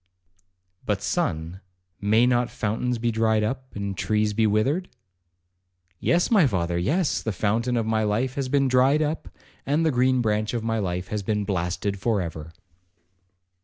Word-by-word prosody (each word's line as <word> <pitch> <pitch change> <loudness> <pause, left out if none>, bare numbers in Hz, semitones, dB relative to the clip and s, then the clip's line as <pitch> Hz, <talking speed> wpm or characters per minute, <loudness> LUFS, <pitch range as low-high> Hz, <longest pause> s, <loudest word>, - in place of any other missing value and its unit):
'But, 105 - 0
my - - -21
son, 90 - -2 0.4
may 110 +4 +3
not 125 -1 +2
fountains 115 +3 -2
be 115 +1 0
dried 110 -1 +2
up, 130 +4 -4
and 100 -1 -3
trees 105 +2 0
be 110 +1 +2
withered?' 135 - +1 1.1
'Yes, 175 +5 +1
my 195 -10 +5
father,—yes,—the 95 - 0
fountain 115 +5 0
of 115 - 0
my 110 0 +1
life 110 +5 0
has 135 -1 -3
been 140 0 +2
dried 130 +4 +3
up, 155 +2 -3 0.3
and 150 +4 +1
the 160 - +3
green 130 0 +2
branch 110 0 0
of 115 - -2
my 115 0 -1
life 90 -2 -3
has 105 -1 -2
been 105 +1 -1
blasted 95 +1 -2
for 110 0 +1
ever.' 80 -2 -5
110 Hz, 160 wpm, -25 LUFS, 100-130 Hz, 1.1 s, my